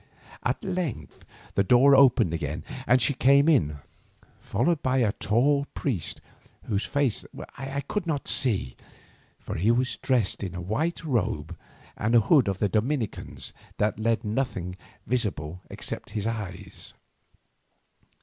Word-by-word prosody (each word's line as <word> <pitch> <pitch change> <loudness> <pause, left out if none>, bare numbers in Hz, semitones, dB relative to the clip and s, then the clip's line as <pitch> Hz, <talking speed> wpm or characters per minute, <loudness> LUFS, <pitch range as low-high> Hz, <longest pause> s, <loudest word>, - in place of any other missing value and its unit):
At - - -1
length 180 - -4 0.3
the 100 - +3
door 125 +6 +6
opened 130 -11 +5
again, 75 -2 -3 0.2
and 130 +1 +5
she 130 +4 +3
came 140 +3 +4
in, 80 - +3 0.6
followed 145 +10 0
by 130 0 +1
a 115 -5 +3
tall 140 +8 +2
priest 110 - -2 0.4
whose 100 -1 -1
face 140 -6 0 0.3
I 135 +1 -4
could 175 +6 -3
not 145 -4 -2
see, 100 - +1 0.6
for - - -7
he 100 +7 +2
was 125 +1 +1
dressed 125 -7 0
in 95 -3 -4
the 90 - -5
white 135 - -2
robe 90 - -1 0.4
and 115 +3 0
hood 125 +2 +5
of 100 -2 0
the 105 - +1
Dominicans 115 +4 -2 0.2
that 105 0 0
left 115 +1 +1
nothing 105 -6 -2 0.3
visible 90 -9 -2
except - - -6
his 105 - -2
eyes. 100 -4 -6
115 Hz, 135 wpm, -26 LUFS, 100-140 Hz, 0.6 s, door